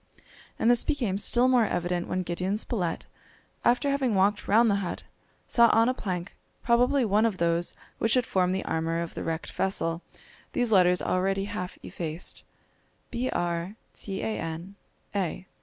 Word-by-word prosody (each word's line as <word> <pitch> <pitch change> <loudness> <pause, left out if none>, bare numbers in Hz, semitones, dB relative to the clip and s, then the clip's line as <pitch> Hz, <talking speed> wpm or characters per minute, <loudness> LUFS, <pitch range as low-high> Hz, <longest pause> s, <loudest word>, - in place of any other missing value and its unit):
And 230 - +4
this 240 - +4
became 220 -9 -1
still 240 +4 +3
more 250 -3 +4
evident 175 -2 -1
when 185 0 -1
Gideon 180 +4 -1
Spilett, 195 -6 -2 0.6
after 250 +4 +3
having 265 -6 +1
walked 200 +2 +2
round 225 +4 +5
the 200 - +2
hut, 180 - -4 0.4
saw 235 -1 +5
on 225 +1 +4
a 255 - +2
plank, 185 -7 -4 0.3
probably 245 +3 +3
one 210 +1 +3
of 225 -5 +1
those 170 0 0 0.2
which 225 +1 +2
had 250 -2 +2
formed 185 -1 +1
the 190 - -3
armour 165 +1 -1
of 170 -1 -4
the - - -5
wrecked 165 0 -3
vessel, 170 -3 -1 0.5
these 245 -2 0
letters 180 -3 +5
already 195 +1 0
half 180 -2 -5
effaced: 165 0 -5 0.7
"Br 245 +1 -1
tan 175 +3 -2 1.4
a." 185 -2 -2
195 Hz, 155 wpm, -27 LUFS, 175-235 Hz, 1.4 s, round